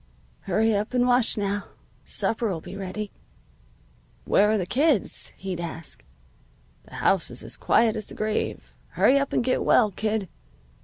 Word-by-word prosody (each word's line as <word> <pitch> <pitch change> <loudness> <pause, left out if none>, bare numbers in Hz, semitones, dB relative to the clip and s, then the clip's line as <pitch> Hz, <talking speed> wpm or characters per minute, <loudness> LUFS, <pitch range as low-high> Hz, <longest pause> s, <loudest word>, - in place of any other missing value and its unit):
"'Hurry 225 +1 +2
up 210 +4 -1
and 245 0 +3
wash, 245 -2 +3
now. 205 0 -1 0.4
Supper'll 220 -6 -1
be 180 +4 -9
ready.' 200 +2 -5 1.1
"'Where 210 +1 +4
are 215 - +3
the 185 - -1
kids?' 275 - +1
he'd 185 -2 -5
ask. 165 -1 -5 0.8
'The - - -13
house - - +2
is - - -4
as - - -4
quiet 225 -1 +3
as 215 -2 -4
the - - -9
grave. 215 0 -2 0.2
Hurry 280 +2 +4
up 275 - -2
and - - +1
get 255 +1 +1
well, 215 -4 +4
kid. 215 0 -1
215 Hz, 155 wpm, -25 LUFS, 195-235 Hz, 1.1 s, Where